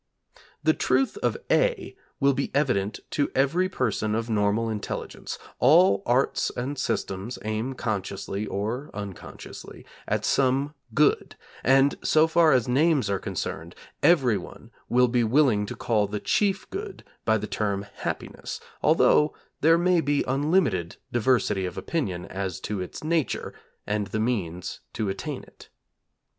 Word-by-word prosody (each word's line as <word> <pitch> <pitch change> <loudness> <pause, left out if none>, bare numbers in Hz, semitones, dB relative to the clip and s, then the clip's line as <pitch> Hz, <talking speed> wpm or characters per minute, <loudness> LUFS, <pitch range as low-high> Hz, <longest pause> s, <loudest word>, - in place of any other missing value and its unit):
The - - +4
truth 270 +6 +1
of 430 - 0
(a) - - +1 0.2
will 140 0 +4
be 140 +1 -2
evident 125 -8 +1
to 145 - +1
every 165 +8 +2
person 110 - -1
of 115 +1 -2
normal 105 +2 +1
intelligence: 110 -2 -5 0.2
all 170 +10 +5
arts 125 +3 +2
and 130 +4 -2
systems 100 -2 -2
aim 110 +5 -2
consciously, 100 -2 -3
or 115 +8 -3
unconsciously, 100 -2 -9 0.2
at - - 0
some 135 +2 +2 0.2
good, 150 0 +2 0.3
and 135 +2 +4
so 155 0 +5
far 160 0 +4
as 125 -4 +3
names 140 -2 +2
are 100 - 0
concerned 95 -3 -5 0.3
everyone 120 - +2 0.2
will 125 +1 +4
be 120 0 +2
willing 115 -4 +3
to - - -5
call 105 -3 +1
the 105 +1 -3
Chief 195 - +1
Good 395 +1 -6 0.2
by 110 0 +3
the 105 - -4
term 100 -2 -2
Happiness, - - -5 0.2
although 150 0 +4 0.2
there 165 +2 +5
may 175 0 +3
be 145 -1 +1
unlimited 140 - +1
diversity 105 -5 +1
of 90 - -8
opinion 95 - -2
as 95 -2 -4
to 105 -3 -3
its 90 - -7
nature, 160 -2 -1 0.3
and 105 -1 -1
the 110 - -3
means 95 -7 -2
to 105 -3 -2
attain 95 - -4
it. - - -17
125 Hz, 140 wpm, -26 LUFS, 105-145 Hz, 0.3 s, all